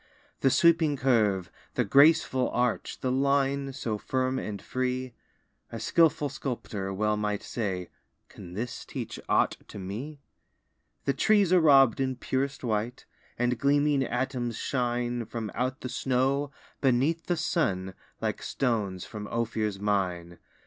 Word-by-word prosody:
The 135 - +4
sweeping 165 -1 +4
curve, 105 -9 +2 0.2
the - - +2
graceful 140 -3 +4
arch, 125 -1 -1
The 130 - 0
line 140 +1 +1
so 115 -5 -3
firm 130 +2 -1
and 105 -2 -5
free; 130 0 -2 0.6
A 115 - -5
skilful 155 +4 +3
sculptor 110 -8 -4
well 105 +2 +1
might 105 -1 -2
say: 95 -6 -3 0.4
"Can 90 0 -11
this 115 +3 -4
teach - - -6
aught - - +3
to - - -10
me?" 110 +11 -6 0.9
The 140 - +2
trees 200 +5 +3
are 180 - +6
rob'd 135 -6 +6
in 130 -1 0
purest 135 +3 -2
white, 115 +1 -2 0.3
And 125 -1 0
gleaming 145 0 +3
atoms 125 -2 -2
shine 120 -2 -1
From 110 -2 -5
out 130 +1 -2
the - - -4
snow, 135 +3 0 0.3
beneath 140 +6 +2
the 175 - +1
sun, 95 - 0 0.3
Like - - -2
stones 105 -8 -1
from 105 -1 -7
Ophir's 110 -3 -2
mine. 90 -4 -1
125 Hz, 135 wpm, -28 LUFS, 105-140 Hz, 0.9 s, are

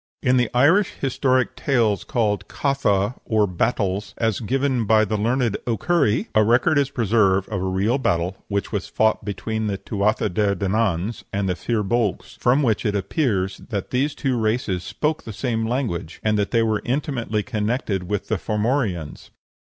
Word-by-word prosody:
In 125 +1 +3
the 125 - +2
Irish 165 +11 +4
historic 130 -1 +1
tales 115 -8 +1
called 105 -5 -1
"Catha; 120 -7 0
or 110 -2 +2
Battles," 100 +1 -1
as 110 -3 0
given 130 +1 0
by 110 +1 +4
the 110 - -2
learned 115 +1 +1
O'Curry, 120 0 +1
a 110 - +5
record 125 +7 +3
is 140 -1 +1
preserved 105 -6 +2
of 100 -4 -2
a - - -2
real 100 +8 +1
battle 90 -5 -1
which 100 -1 -2
was 105 -3 -2
fought 110 0 +1
between 110 +2 -3
the 100 -2 -2
Tuatha 105 +2 0
de 100 +1 +1
Dananns 100 +1 -1
and 100 0 -1
the 90 - 0
Fir 110 +2 -1
Bolgs, 105 -1 -1
from 130 +4 +3
which 110 -5 +1
it 105 -3 0
appears 100 - 0
that 100 -5 -4
these 135 +4 0
two 130 -4 -1
races 110 -5 0
spoke 150 - -2
the 110 - -8
same 115 -1 -1
language, 115 - -3
and 110 0 +2
that 100 -1 0
they 115 -1 +2
were 110 -2 0
intimately 120 -5 -1
connected 105 -5 -2
with 105 -1 -2
the 110 -4 -1
Formorians. 105 - -2
110 Hz, 170 wpm, -22 LUFS, 100-125 Hz, -, a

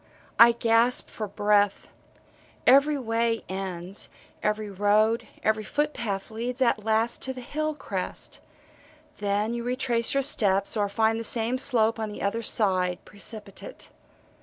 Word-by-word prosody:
I 235 0 +9
gasp 235 +1 +2
for 215 - -5
breath. 205 0 +1 0.8
Every 280 +3 +5
way 230 -2 -1
ends, 190 0 -5 0.3
every 210 0 -1
road, 210 +3 +2 0.2
every 220 0 +1
foot 295 +8 -1
path 200 -2 -4
leads 240 +3 -4
at 235 -4 +2
last 225 +2 +1
to 265 - -3
the 255 - -9
hill 310 +4 -3
crest - - -5 0.8
then 205 +2 0
you 235 0 -3
retrace 245 -1 -1
your 275 - +2
steps, 200 -9 +2
or 205 -2 0
find 220 +2 +1
the - - -4
same 230 +3 0
slope 230 -4 +2
on 220 -1 -2
the 210 - -7
other 200 +3 -1
side, 185 -5 +1
precipitate. 210 - -9
225 Hz, 140 wpm, -26 LUFS, 205-240 Hz, 0.8 s, I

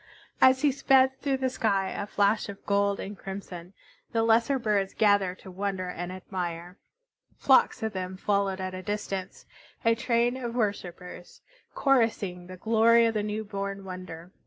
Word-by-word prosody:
As 260 +1 +5
he 290 - +5
sped, 265 0 +3
through 275 -2 0
the 260 0 0
sky, 200 -6 0
a 205 - -4
flash 205 +1 +1
of 200 - -10
gold 200 0 +1
and 205 +2 -6
crimson, 190 -2 -8 0.4
the 225 -1 +2
lesser 230 +4 +3
birds 210 -5 0
gathered 205 -4 +3
to 190 - -11
wonder 190 -1 -3
and 175 0 -5
admire. 180 -1 -6 0.6
Flocks 265 -4 +3
of 220 -1 -2
them 185 0 -5
followed 200 -1 0
at 185 0 -4
a 185 - -6
distance, 195 -1 -5 0.4
a 230 - +5
train 235 +1 +1
of 240 -2 -5
worshipers, 180 -5 -4 0.3
chorusing 220 -9 +1
the 185 0 -9
glory 230 +3 +4
of 225 - +1
the 215 - 0
new 210 +1 -3
born 200 -1 -5
wonder. 180 -2 -8
200 Hz, 160 wpm, -27 LUFS, 185-230 Hz, 0.6 s, As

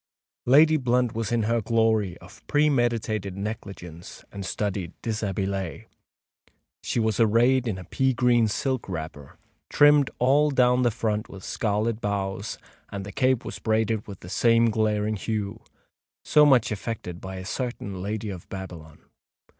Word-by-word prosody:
Lady 155 +5 +6
Blunt 125 -3 +1
was 115 -1 -3
in 120 -2 +1
her 115 +2 +1
glory 110 -4 +1
of 95 +5 -16
premeditated 120 -9 +1
negligence 95 -5 -7
and 100 - -6
studied 95 -2 -3
deshabillée. 100 - -3 1.0
She - - -2
was 110 -1 0
arrayed 120 +3 +3
in 105 -5 -2
a 90 - -8
pea 130 +8 0
green 120 -1 +3
silk 130 +2 -2
wrapper, 80 -5 -7 0.3
trimmed 145 -1 +5
all 140 +4 +3
down 125 -2 +3
the 120 - +3
front 110 -1 -2
with 95 -1 -10
scarlet 110 +1 -1
bows; 100 0 -3 0.3
and 100 -1 -6
the 105 - -7
cape 130 -1 +1
was - - -6
braided 110 -1 0
with 100 -3 -9
the 90 - -10
same 115 +3 +3
glaring 110 -1 0
hue, 105 +1 -4 0.6
so 150 -1 +6
much 125 -6 +4
affected 100 -4 -5
by 95 0 -7
a 95 0 -7
certain 100 -5 -4
Lady 105 +2 -3
of 90 -3 -10
Babylon. 85 -5 -9
110 Hz, 145 wpm, -25 LUFS, 95-120 Hz, 1.0 s, Lady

